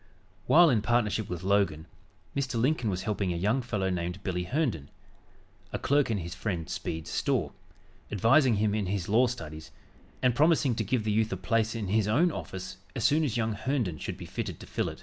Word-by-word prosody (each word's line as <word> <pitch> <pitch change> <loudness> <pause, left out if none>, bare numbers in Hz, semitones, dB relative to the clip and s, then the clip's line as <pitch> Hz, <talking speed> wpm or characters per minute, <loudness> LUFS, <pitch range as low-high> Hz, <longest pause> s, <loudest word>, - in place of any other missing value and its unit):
While 170 -1 +7
in 115 -4 +2
partnership 110 -2 +1
with 90 -1 -5
Logan, 95 -5 +1 0.5
Mr. 130 -4 -1
Lincoln 125 -2 +1
was 95 -2 -2
helping 100 -3 -1
a - - -2
young 105 +9 +1
fellow 105 -6 -1
named 90 +2 -3
"Billy" 90 -2 -2
Herndon, 110 - -1 0.8
a - - -2
clerk 145 -1 +2
in 110 - +1
his 85 -2 -5
friend 85 -7 -3
Speed's 80 -1 -4
store, - - 0 0.6
advising 115 - +4
him 105 0 +1
in 105 -3 -1
his 95 -2 -2
law 120 +5 +4
studies 80 -9 -7 0.5
and 125 -1 +4
promising 150 -1 +3
to 110 - -1
give 110 +2 0
the 110 - 0
youth 110 +2 +1
a - - -2
place 115 -1 0
in 105 -4 -3
his 105 0 +2
own 155 +11 +3
office 95 -9 -6 0.2
as 115 - -2
soon 155 +2 +4
as 125 -6 -1
young 110 -1 0
Herndon 110 - -2
should - - -5
be - - -8
fitted - - -5
to - - -9
fill - - -2
it. - - -10
110 Hz, 205 wpm, -29 LUFS, 95-125 Hz, 0.8 s, While